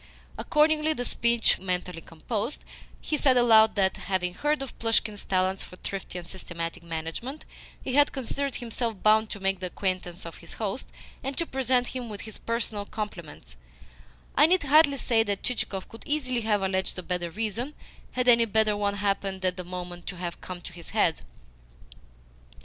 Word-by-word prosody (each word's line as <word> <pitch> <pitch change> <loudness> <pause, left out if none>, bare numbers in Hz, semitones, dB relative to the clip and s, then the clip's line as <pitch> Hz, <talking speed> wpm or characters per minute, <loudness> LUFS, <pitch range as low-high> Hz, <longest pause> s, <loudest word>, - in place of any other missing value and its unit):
Accordingly, 310 - +3
the 245 -4 -3
speech 235 -1 +3
mentally 180 -2 -3
composed, 215 - -4 0.4
he 305 - -1
said 265 -3 +4
aloud 220 -2 +6
that, 190 -2 +2
having 180 -2 -1
heard 295 +7 0
of 270 - -8
Plushkin's 220 -2 +1
talents 190 0 +1
for - - -11
thrifty 190 -1 -5
and 175 -1 -7
systematic 170 -3 -5
management, 170 - -5 0.4
he 260 - -3
had 290 +2 +5
considered 275 +1 -2
himself 230 -3 -3
bound 215 0 +5
to 205 - -6
make 195 -1 0
the 185 - -2
acquaintance 185 -2 -3
of 165 - -8
his 170 - -10
host, 215 +3 -3 0.3
and 270 +1 -3
to 335 - 0
present 255 -3 +1
him 250 -3 -5
with 205 -1 -6
his 220 -1 -9
personal 225 -3 -2
compliments 170 - -6 0.8
(I 295 +3 +6
need 365 0 +3
hardly 290 0 +5
say 230 -3 +3
that 205 -3 -1
Chichikov 200 -6 -2
could 225 - -12
easily 255 -5 0
have 210 -3 +1
alleged 190 0 0
a 180 - -4
better 175 -1 -2
reason, 225 - -2 0.4
had 250 0 0
any 235 -1 +7
better 215 -1 +3
one 205 0 0
happened, 195 -1 -1
at 180 -1 +2
the 180 - -5
moment, 175 -1 -7
to 180 - -5
have 175 -1 -5
come 185 - -6
into 175 0 -10
his 170 -1 -9
head). 190 -7 +2
210 Hz, 175 wpm, -27 LUFS, 185-245 Hz, 0.8 s, any